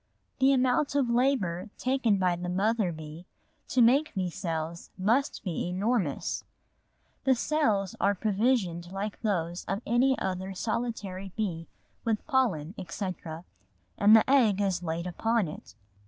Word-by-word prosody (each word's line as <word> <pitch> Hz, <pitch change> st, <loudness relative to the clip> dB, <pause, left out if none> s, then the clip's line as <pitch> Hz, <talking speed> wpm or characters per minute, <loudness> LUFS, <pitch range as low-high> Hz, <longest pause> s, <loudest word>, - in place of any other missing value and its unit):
The 265 Hz, +1 st, +5 dB
amount 260 Hz, +2 st, +2 dB
of 265 Hz, -4 st, +2 dB
labour 225 Hz, -7 st, +1 dB
taken 255 Hz, -5 st, +1 dB
by 180 Hz, -2 st, +2 dB
the 175 Hz, +1 st, -5 dB
mother 200 Hz, +1 st, +1 dB
bee 155 Hz, +2 st, -9 dB, 0.4 s
to 250 Hz, -, +3 dB
make 270 Hz, +4 st, +3 dB
these 180 Hz, -3 st, -2 dB
cells 170 Hz, -3 st, -4 dB
must 235 Hz, +9 st, +1 dB
be 175 Hz, -3 st, -2 dB
enormous. 190 Hz, -, -1 dB, 0.8 s
The 265 Hz, -1 st, +4 dB
cells 220 Hz, -, 0 dB
are 200 Hz, +1 st, +3 dB
provisioned 195 Hz, -4 st, 0 dB
like 200 Hz, +2 st, -4 dB
those 175 Hz, -5 st, -1 dB
of 195 Hz, +4 st, -3 dB
any 260 Hz, +3 st, +3 dB
other 190 Hz, +1 st, -3 dB
solitary 200 Hz, -4 st, -3 dB
bee 175 Hz, -7 st, -3 dB, 0.4 s
with 225 Hz, -2 st, -1 dB
pollen, 195 Hz, -, +1 dB
etc., 175 Hz, -2 st, -5 dB, 0.5 s
and 210 Hz, +2 st, +6 dB
the 220 Hz, -, +5 dB
egg 240 Hz, -8 st, +4 dB
is 190 Hz, -3 st, 0 dB
laid 170 Hz, 0 st, -3 dB
upon 220 Hz, +3 st, 0 dB
it. 150 Hz, -, -10 dB
200 Hz, 140 wpm, -28 LUFS, 180-235 Hz, 0.8 s, and